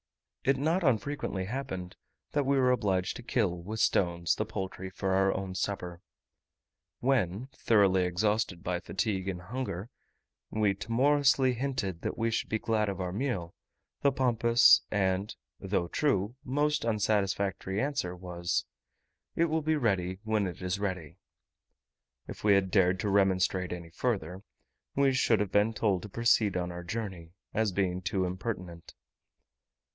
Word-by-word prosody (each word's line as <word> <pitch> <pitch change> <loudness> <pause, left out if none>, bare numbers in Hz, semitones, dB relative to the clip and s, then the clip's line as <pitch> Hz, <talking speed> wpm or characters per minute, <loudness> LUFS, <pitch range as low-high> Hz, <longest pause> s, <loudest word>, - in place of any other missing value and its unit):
It 135 +1 +3
not 160 +7 +1
unfrequently 130 - 0
happened, 95 -6 -5 0.4
that 145 -2 0
we 140 0 +3
were 130 -1 +4
obliged 95 -7 0
to - - -8
kill, 100 -8 0
with 110 +5 -5
stones, 85 -4 +2
the 110 - -2
poultry 95 -2 -5
for 95 +1 -2
our 95 0 +3
own 95 -1 -4
supper. 90 -2 -3 1.0
When, 120 -2 0
thoroughly 95 -4 +3
exhausted 95 0 0
by 90 -1 -1
fatigue 95 +1 -2
and 95 -2 -3
hunger, 115 -2 -5 0.6
we 105 -2 +1
timorously 130 +5 +3
hinted 120 -9 -3
that - - -3
we 115 0 0
should - - -1
be 110 - +1
glad 110 -1 0
of 95 - -4
our 90 -1 -2
meal, 100 -6 -2 0.5
the 140 - +4
pompous, 120 -2 +5
and 95 0 0 0.2
(though 85 - -1
true) 105 - 0
most 150 +3 0
unsatisfactory 100 -3 0
answer 135 -10 -1
was, 85 -1 -2 0.7
"It 170 - +3
will 160 0 0
be 155 +1 +1
ready 95 -9 0
when 110 -3 +1
it 90 +1 -7
is 90 +2 -1
ready." 95 -4 -4 1.1
If - - -9
we 105 -1 +5
had 95 -1 +1
dared 95 -1 +3
to 105 - -1
remonstrate 95 -2 +2
any 85 -2 -6
further, 95 -3 -2 0.5
we 140 -1 +3
should 120 -4 +3
have 105 -2 -1
been 105 +2 +2
told 100 -6 +1
to 105 - -8
proceed 110 -3 +2
on 90 0 -2
our 85 0 -7
journey, 90 -4 -5 0.2
as 110 -2 +1
being 90 -1 -1
too 95 0 0
impertinent. 90 -2 -5
100 Hz, 150 wpm, -30 LUFS, 90-120 Hz, 1.1 s, pompous